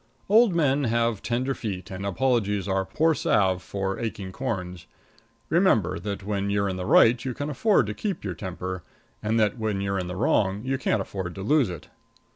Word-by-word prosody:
Old 215 -2 +5
men 145 -3 +2
have 115 -2 +1
tender 125 +3 -1
feet, 100 -8 -5
and 95 +1 -4
apologies 105 -3 0
are 95 0 0
poor 160 +12 +2
salve 100 - +2
for 95 +1 -3
aching 105 -4 -4
corns. 90 -7 -4 0.6
Remember 120 - +2
that 100 -1 -5
when 100 0 -2
you're 100 0 +1
in 95 - -2
the 90 - -4
right 120 +1 +5
you 130 -3 -3
can 145 +2 -3
afford 195 - +3
to 105 - -4
keep 200 - -4
your 95 -3 -3
temper, 90 0 -5 0.4
and 110 +2 +1
that 110 +3 +1
when 110 -3 -1
you're 100 0 -1
in 90 - -3
the 90 - -5
wrong 100 +2 +1
you 130 0 -1
can't 110 -6 +1
afford 95 -4 -5
to 95 - -6
lose 135 0 +3
it. 85 -4 -8
105 Hz, 195 wpm, -25 LUFS, 95-130 Hz, 0.6 s, Old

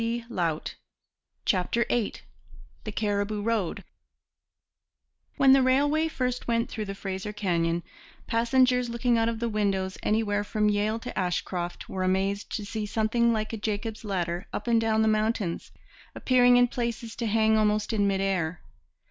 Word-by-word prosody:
CHAPTER 195 +5 +1
VIII 235 -4 0 0.7
THE 215 - -4
CARIBOO 205 0 -1
ROAD 220 -6 -1 1.5
When 270 -2 +6
the 270 - +6
railway 290 +5 +3
first 250 -5 -2
went 230 0 0
through 215 -2 -4
the 195 0 -5
Fraser 195 +1 -4
Canyon, 170 -5 0 0.4
passengers 250 +1 +2
looking 235 0 +1
out 225 0 +2
of 230 - -3
the 235 +1 -2
windows 195 -3 -1
anywhere 210 -1 +1
from 210 0 +1
Yale 210 +2 +1
to 245 +2 -7
Ashcroft 180 -1 -2
were 190 - -4
amazed 195 +2 0
to 210 - -4
see 210 0 -4
something 230 +2 +2
like 215 0 -2
a - - -2
Jacob's 215 +1 -3
ladder 180 -3 -2
up 205 - -4
and 230 -1 +3
down 220 -1 +2
the - - +2
mountains, 215 -4 0 0.4
appearing 245 -1 +4
in 245 0 +5
places 235 -1 -4
to 230 - -2
hang 220 0 +3
almost 215 0 +1
in 205 -2 +2
mid 195 -1 0
air. 180 -4 -1
215 Hz, 150 wpm, -27 LUFS, 200-235 Hz, 1.5 s, When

